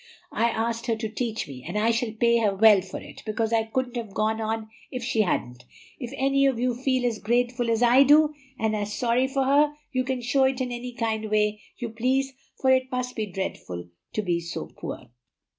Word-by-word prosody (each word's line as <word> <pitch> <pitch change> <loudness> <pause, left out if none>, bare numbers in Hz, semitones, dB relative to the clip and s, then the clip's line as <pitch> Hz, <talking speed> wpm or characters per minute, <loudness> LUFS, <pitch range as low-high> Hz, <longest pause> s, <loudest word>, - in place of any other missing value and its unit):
I 235 - +2
asked 230 +1 -2
her 230 - +2
to 220 0 -3
teach 225 0 -3
me, 130 -3 -9
and - - -4
I 220 +2 +3
shall 230 0 -1
pay 235 +1 +3
her 205 -3 +1
well 210 -1 +7
for 190 +1 -7
it, - - -12
because 220 +1 -1
I 225 -1 +2
couldn't 245 +2 -2
have 225 -4 -6
gone 220 +1 0
on 220 0 -2 0.2
if 255 -2 -5
she 230 -2 +1
hadn't. 125 - -1 0.4
If 245 -3 -6
any 275 +1 +3
of 260 -4 0
you 250 0 +1
feel 255 0 0
as 230 -3 0
grateful 240 +2 0
as 230 +1 +2
I 245 +3 +6
do, 300 +2 +6 0.2
and 220 0 0
as 205 0 -3
sorry 245 +3 +1
for 270 0 0
her, 290 +2 +3 0.2
you 255 -1 0
can 260 -1 -2
show 265 +2 +3
it 265 0 +1
in 255 -1 -2
any 245 +1 -5
kind 220 -2 -2
way 210 0 +1 0.2
you 235 - -4
please, 260 +4 0 0.3
for 260 - +3
it 260 0 +2
must 250 0 -3
be 220 -2 -2
dreadful 90 - -5 0.2
to 215 - 0
be 175 -3 0
so 170 0 -6
poor." - - -7
235 Hz, 220 wpm, -26 LUFS, 215-255 Hz, 0.4 s, well